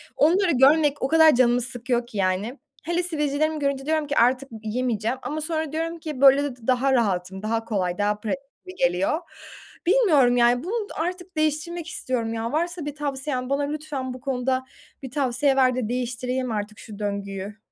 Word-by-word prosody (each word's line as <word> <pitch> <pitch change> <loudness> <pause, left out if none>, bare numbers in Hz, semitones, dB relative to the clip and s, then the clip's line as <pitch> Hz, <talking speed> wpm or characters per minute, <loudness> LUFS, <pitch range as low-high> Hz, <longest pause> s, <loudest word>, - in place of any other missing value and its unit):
onları 350 +5 +3
görmek 290 +2 +4
o - - +1
kadar 320 0 +6
canımı 245 0 +3
sıkıyor 245 0 -2
ki, 230 -4 -9
yani. 195 +7 -1 0.2
Hele 345 +2 0
sivilcelerimi 310 -2 0
görünce 280 -1 -1
diyorum 310 -1 0
ki 285 - -2
"Artık 255 +3 +3
y 225 - -8
yemeyeceğim." 230 +1 -1
ama 310 +1 -4
sonra 315 -1 -2
diyorum 330 +2 -3
ki 305 -5 -6
"Böyle 275 +1 +7
de 285 -3 -3
d 235 -3 -16
daha 260 +1 +3
rahatım." 190 -5 0
Daha 225 +1 -1
kolay, 185 -5 -1
daha 210 0 0
pratik 220 +5 -2 0.3
gibi 370 0 -10
geliyor. 180 - +1 0.7
Bilmiyorum, 325 - +4
yani, 245 +1 +4
bunu 420 +4 -2
artık 360 0 -5
değiştirmek 310 +2 -1
istiyorum 250 -7 -2
ya. 230 +1 -3
Varsa 340 +1 -2
bir 295 -1 -5
tavsiyen 270 -3 -3
bana 280 +1 +1
lütfen 285 -3 -4
bu 255 - -9
konuda 260 -1 -1 0.4
bir 265 - -6
tavsiye 270 0 +1
ver 255 -2 +4
de 245 -4 -2
değiştireyim 250 +1 -2
artık 210 0 -4
şu 210 -2 -10
döngüyü. 200 0 -4
265 Hz, 180 wpm, -24 LUFS, 235-310 Hz, 0.7 s, Böyle